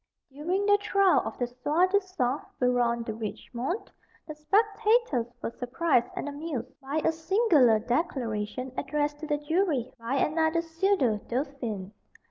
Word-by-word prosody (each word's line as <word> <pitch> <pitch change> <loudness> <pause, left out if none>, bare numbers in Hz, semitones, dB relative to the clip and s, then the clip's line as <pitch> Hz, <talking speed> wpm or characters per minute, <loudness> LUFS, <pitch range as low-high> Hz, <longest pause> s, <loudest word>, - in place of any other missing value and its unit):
During 350 +8 -1
the 410 0 +5
trial 395 -2 +3
of - - -5
the 245 - 0
soi 275 +8 +1
disant 370 -9 0 0.2
Baron 245 -2 +2
de 225 - -4
Richemont, 235 - -4 0.4
the 305 - -5
spectators 415 - +2 0.2
were - - -2
surprised 245 +1 +1
and - - -4
amused 290 -4 -5
by 280 +4 -2
a - - +4
singular 320 - +4
declaration 240 -2 -2
addressed 295 +1 -1
to 310 - -6
the 295 -1 +1
jury 295 -4 0
by 230 +4 -2
another 320 +4 +1
pseudo 330 - +1
dauphin. 240 -7 -3
290 Hz, 135 wpm, -28 LUFS, 245-345 Hz, 0.4 s, the